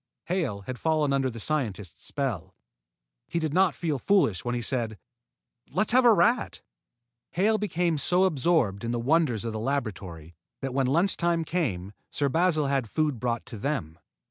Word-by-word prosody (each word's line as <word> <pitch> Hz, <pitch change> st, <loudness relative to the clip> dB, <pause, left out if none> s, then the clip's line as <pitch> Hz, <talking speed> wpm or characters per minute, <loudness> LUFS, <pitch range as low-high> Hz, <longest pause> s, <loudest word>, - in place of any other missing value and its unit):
Hale 160 Hz, -, -1 dB
had 125 Hz, +5 st, -7 dB
fallen 155 Hz, -3 st, +1 dB
under 135 Hz, -1 st, +1 dB
the 115 Hz, -2 st, -8 dB
scientist's 105 Hz, -, -3 dB
spell. 130 Hz, -, -3 dB, 0.7 s
He 170 Hz, -, -3 dB
did 160 Hz, -3 st, -1 dB
not 185 Hz, 0 st, +3 dB
feel 155 Hz, -5 st, -2 dB
foolish 180 Hz, -, +2 dB
when 120 Hz, 0 st, -1 dB
he 120 Hz, -, -2 dB
said: 115 Hz, -3 st, -1 dB, 0.7 s
"Let's 210 Hz, +4 st, 0 dB
have 255 Hz, +1 st, +5 dB
a 235 Hz, -, +8 dB
rat!" 225 Hz, +5 st, +2 dB, 0.7 s
Hale 215 Hz, +5 st, +2 dB
became 175 Hz, -6 st, 0 dB
so 180 Hz, +7 st, +3 dB
absorbed 140 Hz, -, +1 dB
in 115 Hz, +1 st, -2 dB
the 120 Hz, -, -1 dB
wonders 130 Hz, -4 st, +1 dB
of 115 Hz, -, -3 dB
the 110 Hz, -, -3 dB
laboratory 100 Hz, -, -4 dB, 0.3 s
that 135 Hz, -2 st, -3 dB
when 135 Hz, -1 st, +1 dB
lunch 170 Hz, +9 st, +2 dB
time 170 Hz, -1 st, +1 dB
came, 105 Hz, -, -2 dB, 0.2 s
Sir 140 Hz, -1 st, 0 dB
Basil 165 Hz, 0 st, +2 dB
had 135 Hz, -5 st, 0 dB
food 150 Hz, -4 st, 0 dB
brought 120 Hz, -1 st, -2 dB
to 115 Hz, -, -8 dB
them. 105 Hz, -, -3 dB
140 Hz, 170 wpm, -27 LUFS, 115-170 Hz, 0.7 s, a